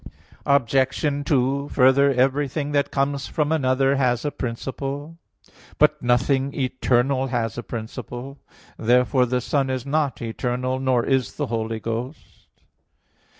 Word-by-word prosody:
Obj. 140 +2 +1
2: 140 +1 +1
Further, 135 +2 +4
everything 140 +3 0
that 140 -1 +1
comes 140 0 -1
from 150 -1 -1
another 135 -2 +2
has 125 -1 +1
a 145 - 0
principle. 135 +6 -5 0.6
But - - +3
nothing 135 +3 +1
eternal 130 +1 +1
has 115 -4 -2
a 120 - -4
principle. 120 +4 -7 0.4
Therefore 125 +2 +3
the 125 +1 0
Son 135 +2 0
is 130 -1 -3
not 145 -2 0
eternal; 125 +3 -2
nor 130 -3 +1
is 130 -3 0
the - - -2
Holy 115 -1 -3
Ghost. 115 +6 -6
130 Hz, 125 wpm, -23 LUFS, 125-140 Hz, 0.6 s, Further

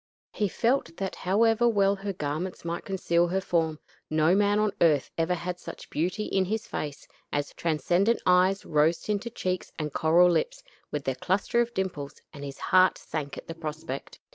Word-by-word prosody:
He 210 - 0
felt 230 -4 0
that 195 -1 -3
however 225 +5 +3
well 200 -3 +3
her 200 +1 -3
garments 165 +2 -4
might 170 +1 -3
conceal 175 -3 +1
her 190 +3 0
form, 165 -4 0 0.3
no 155 +2 +3
man 205 +1 +3
on 210 -1 +2
earth 150 -5 +3
ever 165 +2 +1
had 180 +1 -4
such - - -10
beauty 180 +6 -1
in 195 -2 +1
his 215 +3 -2
face 150 -1 -5 0.2
as 145 0 -1
her - - -20
transcendent 175 - +1
eyes, 185 +2 +4
rose 155 +2 +3
tinted 210 +3 -3
cheeks, 185 0 -2
and 150 -2 -3
coral 175 +3 +5
lips, - - -1 0.3
with 145 -1 -3
their 135 - 0
cluster 195 - +1
of 235 0 -3
dimples; 155 -7 -3
and 140 -2 -9
his 140 -1 -6
heart 185 0 +4
sank 145 -3 -5
at - - -8
the 165 - -5
prospect. 155 -4 -6
180 Hz, 185 wpm, -27 LUFS, 155-200 Hz, 0.3 s, coral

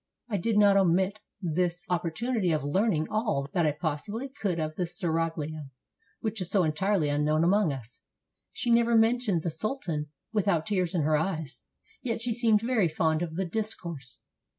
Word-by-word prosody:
I 205 - 0
did 210 +4 0
not 200 -1 +6
omit 190 +2 +2 0.2
this 175 +3 -1
op 180 -2 0
portunity 195 0 0
of 150 - -2
learning 160 +1 +1
all 210 - 0
that 170 -3 +2
I - - +3
possibly 180 - -3
could 200 -10 -2
of 155 0 -2
the 180 0 -1
seraglio, 160 -3 -2 0.5
which 220 -2 -2
is 180 - -2
so 195 -3 +3
entirely 170 +2 +1
unknown 150 +2 +2
among 195 -1 +3
us. 125 -4 -8 0.5
She 240 - -1
never 235 0 +4
mentioned 225 -6 +3
the 170 - -1
sultan 165 - -3 0.3
without 200 -6 +1
tears 185 -4 0
in 165 - +2
her 155 +1 +3
eyes, 160 -3 -3 0.4
yet 230 -4 -2
she 230 0 -1
seemed 220 -2 +3
very 230 -5 +2
fond 160 0 +1
of 165 -2 -3
the 190 +2 -1
discourse. 170 - -5
180 Hz, 175 wpm, -28 LUFS, 155-215 Hz, 0.5 s, not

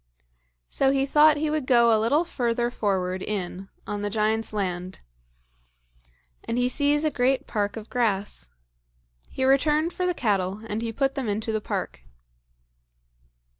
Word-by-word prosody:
So 270 - +1
he 270 0 +2
thought 300 +2 +5
he 300 0 -1
would 305 -4 -2
go 235 -2 +5
a 215 - +1
little 290 +10 +2
further 240 -5 -1
forward 190 -4 -1
in 190 -2 -4 0.2
on 205 0 -4
the 205 - -2
giant's 220 +1 0
land; 185 -3 -4 1.4
and 230 - -3
he 245 0 +2
sees 290 +3 +2
a 310 - +2
great 260 +1 +1
park 205 -1 -2
of 220 0 -8
grass. 205 - -1 0.8
He 260 - -2
returned 300 +5 +2
for 360 +1 -1
the 360 - 0
cattle, 200 - -1
and 215 +1 -3
he 230 -1 -2
put 270 +4 0
them 265 -6 -3
into 220 +2 -2
the 215 -1 -1
park. - - -4
230 Hz, 155 wpm, -25 LUFS, 205-275 Hz, 1.4 s, thought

